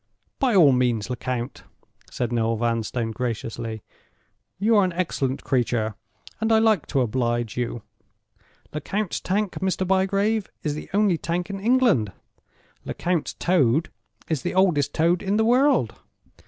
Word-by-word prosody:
"By 255 Hz, -6 st, +2 dB
all 160 Hz, -7 st, +7 dB
means, 125 Hz, -2 st, +1 dB
Lecount," 125 Hz, 0 st, -4 dB, 0.5 s
said 120 Hz, -1 st, -3 dB
Noel 115 Hz, -1 st, +1 dB
Vanstone, 115 Hz, 0 st, -1 dB
graciously. 115 Hz, -2 st, -4 dB, 0.7 s
"You 215 Hz, +4 st, +3 dB
are 200 Hz, -, +5 dB
an 180 Hz, -2 st, 0 dB
excellent 140 Hz, -7 st, -2 dB
creature, 120 Hz, -4 st, 0 dB, 0.5 s
and 220 Hz, 0 st, 0 dB
I 220 Hz, -, +6 dB
like 220 Hz, -6 st, +3 dB
to 135 Hz, -, +1 dB
oblige 120 Hz, -1 st, -1 dB
you. 120 Hz, -2 st, -3 dB, 0.9 s
Lecount's 190 Hz, +6 st, -2 dB
Tank, 200 Hz, +1 st, -1 dB
Mr. 190 Hz, 0 st, -1 dB
Bygrave, 195 Hz, +3 st, +1 dB
is 150 Hz, -, -1 dB
the 150 Hz, -, -7 dB
only 200 Hz, -4 st, +2 dB
Tank 175 Hz, +3 st, -2 dB
in 195 Hz, -, -5 dB
England—Lecount's 180 Hz, -, -1 dB
Toad 155 Hz, -4 st, +2 dB, 0.4 s
is 155 Hz, -5 st, -1 dB
the 175 Hz, -, -3 dB
oldest 180 Hz, -7 st, +2 dB
Toad 170 Hz, +2 st, +2 dB
in 200 Hz, +1 st, 0 dB
the 220 Hz, -, +3 dB
world. 250 Hz, -, +3 dB
155 Hz, 135 wpm, -24 LUFS, 120-195 Hz, 0.9 s, all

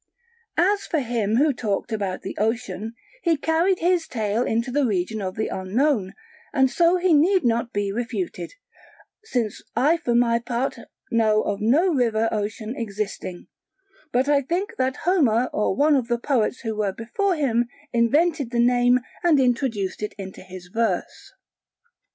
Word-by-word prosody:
As 400 Hz, +4 st, +2 dB
for 325 Hz, -, 0 dB
him 225 Hz, -4 st, -1 dB
who 290 Hz, +4 st, +3 dB
talked 220 Hz, -2 st, -2 dB
about 200 Hz, -4 st, -3 dB
the -, -, -5 dB
Ocean, 220 Hz, -1 st, -2 dB, 0.3 s
he 335 Hz, -3 st, +2 dB
carried 330 Hz, +5 st, +2 dB
his 350 Hz, -1 st, +1 dB
tale 220 Hz, -1 st, -1 dB
into 235 Hz, +1 st, -1 dB
the 290 Hz, +2 st, +1 dB
region 210 Hz, -1 st, -1 dB
of 185 Hz, -1 st, -4 dB
the 215 Hz, -, -1 dB
unknown, 205 Hz, +2 st, 0 dB, 0.4 s
and 265 Hz, -2 st, +3 dB
so 345 Hz, +3 st, +3 dB
he 360 Hz, -1 st, +2 dB
need 360 Hz, +5 st, +4 dB
not 235 Hz, 0 st, +1 dB
be 205 Hz, -1 st, -1 dB
refuted; 240 Hz, -, -4 dB, 0.7 s
since 245 Hz, -, -2 dB
I 290 Hz, +8 st, +3 dB
for 245 Hz, -8 st, -1 dB
my 235 Hz, -1 st, +3 dB
part 245 Hz, +2 st, -2 dB, 0.3 s
know 220 Hz, -2 st, +3 dB
of 205 Hz, 0 st, -2 dB
no 310 Hz, -, +3 dB
river 225 Hz, -4 st, +1 dB
Ocean 215 Hz, +2 st, -3 dB
existing, 200 Hz, -6 st, -5 dB, 0.7 s
but 255 Hz, +3 st, +1 dB
I 290 Hz, -1 st, +4 dB
think 350 Hz, +9 st, -2 dB
that 260 Hz, 0 st, 0 dB
Homer 255 Hz, -, +3 dB
or 210 Hz, -2 st, 0 dB
one 295 Hz, +5 st, +4 dB
of 255 Hz, -4 st, 0 dB
the 240 Hz, -1 st, +1 dB
poets 245 Hz, -1 st, 0 dB
who 225 Hz, -3 st, -3 dB
were 205 Hz, -2 st, -1 dB
before 360 Hz, -, -1 dB
him 240 Hz, -6 st, +1 dB, 0.3 s
invented 280 Hz, +4 st, +2 dB
the 240 Hz, -1 st, -1 dB
name 245 Hz, +1 st, +4 dB, 0.2 s
and 330 Hz, -5 st, +4 dB
introduced 245 Hz, -7 st, 0 dB
it 210 Hz, -, -4 dB
into 190 Hz, -1 st, -8 dB
his 185 Hz, -1 st, -11 dB
verse. 230 Hz, -, -2 dB
240 Hz, 160 wpm, -23 LUFS, 215-290 Hz, 0.7 s, need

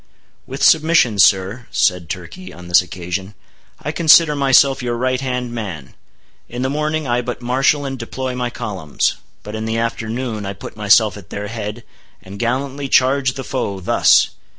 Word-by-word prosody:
"With 135 Hz, +2 st, -5 dB
submission, 155 Hz, -9 st, +4 dB
sir," 100 Hz, +6 st, +3 dB
said 90 Hz, -4 st, 0 dB
Turkey 95 Hz, -, -7 dB
on 90 Hz, 0 st, -12 dB
this 90 Hz, -, +6 dB
occasion, 90 Hz, +3 st, -6 dB, 0.4 s
"I 150 Hz, -, -4 dB
consider 160 Hz, -1 st, +5 dB
myself 135 Hz, -1 st, +4 dB
your 120 Hz, -1 st, -2 dB
right 130 Hz, +1 st, -1 dB
hand 125 Hz, -2 st, -3 dB
man. 90 Hz, -, -6 dB, 0.6 s
In 120 Hz, +1 st, -4 dB
the 130 Hz, -, -1 dB
morning 150 Hz, 0 st, -2 dB
I 120 Hz, 0 st, +1 dB
but 125 Hz, 0 st, -6 dB
marshal 135 Hz, +4 st, +1 dB
and 135 Hz, -1 st, -5 dB
deploy 130 Hz, +2 st, -4 dB
my 125 Hz, -1 st, -2 dB
columns; 100 Hz, -11 st, -2 dB, 0.3 s
but 105 Hz, -, -8 dB
in 110 Hz, 0 st, -4 dB
the 110 Hz, 0 st, -2 dB
afternoon 115 Hz, 0 st, -3 dB
I 100 Hz, 0 st, -4 dB
put 100 Hz, -, -10 dB
myself 105 Hz, -1 st, +3 dB
at 100 Hz, -, -13 dB
their 105 Hz, 0 st, -5 dB
head, 110 Hz, +1 st, -6 dB, 0.4 s
and 100 Hz, +2 st, -11 dB
gallantly 135 Hz, +3 st, -2 dB
charge 130 Hz, 0 st, +3 dB
the 135 Hz, -, -5 dB
foe, 100 Hz, -7 st, -3 dB
thus!" 90 Hz, -, +3 dB
120 Hz, 170 wpm, -18 LUFS, 100-135 Hz, 0.6 s, this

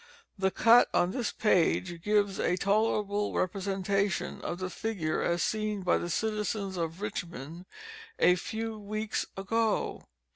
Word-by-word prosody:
The 190 Hz, -1 st, +1 dB
cut 230 Hz, +5 st, +5 dB
on 175 Hz, -, +3 dB
this 240 Hz, -1 st, -2 dB
page 175 Hz, -4 st, +1 dB
gives 205 Hz, 0 st, +1 dB
a 180 Hz, -, +1 dB
tolerable 205 Hz, 0 st, +1 dB
representation 195 Hz, +1 st, -1 dB
of 175 Hz, -, -3 dB
the 185 Hz, 0 st, -4 dB
figure 185 Hz, -9 st, -2 dB
as 170 Hz, 0 st, +1 dB
seen 215 Hz, -2 st, -1 dB
by 180 Hz, -, +3 dB
the 175 Hz, -, -4 dB
citizens 210 Hz, 0 st, -1 dB
of 165 Hz, +1 st, -3 dB
Richmond 175 Hz, -5 st, -5 dB, 0.5 s
a 180 Hz, -, +5 dB
few 220 Hz, +4 st, -4 dB
weeks 215 Hz, +1 st, -3 dB
ago. 220 Hz, +3 st, -1 dB
200 Hz, 135 wpm, -29 LUFS, 180-215 Hz, 0.5 s, cut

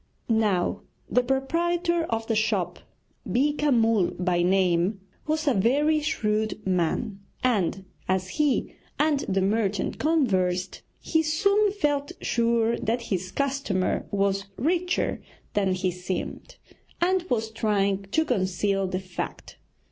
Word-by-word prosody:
Now, 210 Hz, -6 st, +1 dB, 0.3 s
the 250 Hz, -, +4 dB
proprietor 335 Hz, +6 st, 0 dB
of 225 Hz, -5 st, -2 dB
the 225 Hz, -, 0 dB
shop, 205 Hz, -5 st, 0 dB, 0.5 s
Beeka 290 Hz, +7 st, +2 dB
Mull 225 Hz, -6 st, +3 dB
by 180 Hz, -1 st, +1 dB
name, 185 Hz, +1 st, +2 dB, 0.3 s
was 310 Hz, 0 st, -1 dB
a 280 Hz, -, +5 dB
very 285 Hz, +10 st, +3 dB
shrewd 215 Hz, -8 st, -1 dB
man, 190 Hz, +3 st, 0 dB, 0.2 s
and 195 Hz, -6 st, +1 dB, 0.2 s
as 185 Hz, 0 st, 0 dB
he 295 Hz, 0 st, 0 dB, 0.2 s
and 300 Hz, -2 st, +2 dB
the 190 Hz, 0 st, +1 dB
merchant 200 Hz, -1 st, 0 dB
conversed, 190 Hz, -, +1 dB, 0.2 s
he 320 Hz, -, +1 dB
soon 400 Hz, +6 st, +2 dB
felt 290 Hz, -7 st, 0 dB
sure 235 Hz, -1 st, +1 dB
that 235 Hz, +2 st, -1 dB
his 185 Hz, 0 st, -2 dB
customer 275 Hz, -9 st, -1 dB
was 195 Hz, 0 st, 0 dB
richer 355 Hz, +5 st, 0 dB, 0.3 s
than 195 Hz, -2 st, +2 dB
he 185 Hz, 0 st, 0 dB
seemed, 180 Hz, -, -5 dB, 0.4 s
and 370 Hz, +2 st, +2 dB
was 220 Hz, -2 st, 0 dB
trying 200 Hz, -3 st, 0 dB
to 320 Hz, +9 st, +2 dB
conceal 195 Hz, -, 0 dB
the 185 Hz, 0 st, -2 dB
fact. 185 Hz, -2 st, -7 dB
220 Hz, 125 wpm, -26 LUFS, 190-290 Hz, 0.5 s, a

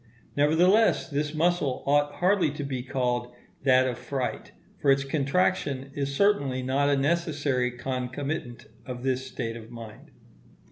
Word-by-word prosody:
Nevertheless 175 Hz, +9 st, +4 dB
this 150 Hz, +1 st, -2 dB
muscle 160 Hz, -5 st, +1 dB
ought 145 Hz, +1 st, +2 dB
hardly 180 Hz, -2 st, +2 dB
to 150 Hz, -, -5 dB
be 135 Hz, -3 st, -3 dB
called 125 Hz, -1 st, -2 dB, 0.3 s
that 130 Hz, -1 st, +4 dB
of 120 Hz, -2 st, -3 dB
fright, 130 Hz, -3 st, -4 dB, 0.3 s
for 140 Hz, -, +1 dB
its 135 Hz, 0 st, +4 dB
contraction 140 Hz, -1 st, 0 dB
is 140 Hz, -1 st, -3 dB
certainly 140 Hz, -10 st, +2 dB
not 140 Hz, +2 st, +1 dB
a 140 Hz, -, +3 dB
necessary 145 Hz, -4 st, 0 dB
concomitant 125 Hz, +1 st, -4 dB, 0.2 s
of 125 Hz, -1 st, -7 dB
this 130 Hz, 0 st, -1 dB
state 115 Hz, -3 st, -4 dB
of 115 Hz, -1 st, -10 dB
mind. 115 Hz, -2 st, -11 dB
135 Hz, 140 wpm, -27 LUFS, 125-150 Hz, 0.3 s, Nevertheless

